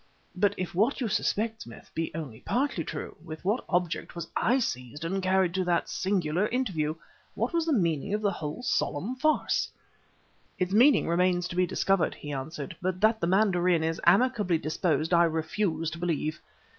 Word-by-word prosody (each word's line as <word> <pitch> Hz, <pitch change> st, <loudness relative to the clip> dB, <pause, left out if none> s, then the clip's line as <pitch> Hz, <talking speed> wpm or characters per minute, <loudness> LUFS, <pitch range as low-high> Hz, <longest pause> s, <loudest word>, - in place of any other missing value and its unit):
"But, 200 Hz, +2 st, +2 dB
if 185 Hz, -, -4 dB
what 220 Hz, +11 st, +2 dB
you 245 Hz, -, 0 dB
suspect, 220 Hz, +2 st, -1 dB
Smith, 115 Hz, -, -12 dB
be 165 Hz, 0 st, -2 dB
only 140 Hz, -9 st, -6 dB
partly 250 Hz, -, -1 dB
true, -, -, -6 dB
with 160 Hz, 0 st, -9 dB
what 210 Hz, +6 st, +1 dB
object 175 Hz, -2 st, -1 dB
was 170 Hz, -1 st, -5 dB
I 245 Hz, +4 st, +3 dB
seized 145 Hz, -, -3 dB
and 190 Hz, +3 st, -1 dB
carried 185 Hz, -1 st, +2 dB
to 190 Hz, 0 st, 0 dB
that 175 Hz, -1 st, +1 dB
singular 185 Hz, -1 st, 0 dB
interview? 185 Hz, -12 st, -1 dB, 0.4 s
What -, -, -1 dB
was 335 Hz, -1 st, +1 dB
the 320 Hz, -, +3 dB
meaning 170 Hz, -, 0 dB
of 215 Hz, -, -2 dB
the 200 Hz, -, +3 dB
whole 155 Hz, +10 st, -5 dB
solemn 210 Hz, -, -1 dB
farce?" 310 Hz, +4 st, +1 dB, 0.9 s
"Its 180 Hz, +1 st, -1 dB
meaning 255 Hz, +7 st, +5 dB
remains 175 Hz, +1 st, +2 dB
to -, -, -6 dB
be 180 Hz, 0 st, +2 dB
discovered," 195 Hz, 0 st, +1 dB
he 145 Hz, 0 st, -7 dB
answered; 145 Hz, +4 st, -5 dB
"but 185 Hz, 0 st, -1 dB
that 220 Hz, +1 st, +3 dB
the 170 Hz, -, +1 dB
mandarin 180 Hz, -3 st, +3 dB
is 165 Hz, +1 st, -1 dB
amicably 200 Hz, -2 st, +3 dB
disposed 155 Hz, +1 st, 0 dB
I 170 Hz, 0 st, +6 dB
refuse 165 Hz, +1 st, -1 dB
to 170 Hz, -, -7 dB
believe. 160 Hz, -3 st, -2 dB
180 Hz, 180 wpm, -28 LUFS, 160-210 Hz, 0.9 s, I